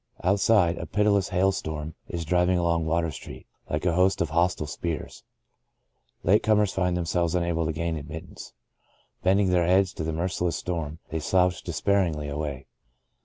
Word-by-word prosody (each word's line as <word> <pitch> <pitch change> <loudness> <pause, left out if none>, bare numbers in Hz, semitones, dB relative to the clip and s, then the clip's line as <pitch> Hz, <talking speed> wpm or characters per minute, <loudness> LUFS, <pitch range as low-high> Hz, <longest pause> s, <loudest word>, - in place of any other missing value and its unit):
Out 100 +3 +2
side, 95 -5 +3
a - - -5
pitiless 100 -2 +2
hail 95 +1 +2
storm 80 -4 -5
is 85 -2 -4
driving 90 +2 +2
along 85 -2 +1
Water 85 0 0
Street, - - -10 0.2
like 75 +3 -2
a 85 - +2
host 90 +2 +3
of 85 -3 -1
hostile 85 -1 +1
spears. 80 +2 -5 1.0
Late 100 +5 +4
comers 105 -2 +2
find 90 -2 0
themselves 85 0 0
unable 85 -2 0
to - - 0
gain 80 +1 -2
admittance. 80 +2 -8 0.7
Bending 95 +1 +3
their 90 -2 +3
heads 95 +1 +3
to - - -5
the 80 - -2
merciless 90 +1 -1
storm, 80 -4 -4
they 80 -1 -2
slouch 90 +2 +2
despairingly 85 -4 0
away. 70 -2 -4
85 Hz, 165 wpm, -26 LUFS, 80-95 Hz, 1.0 s, Late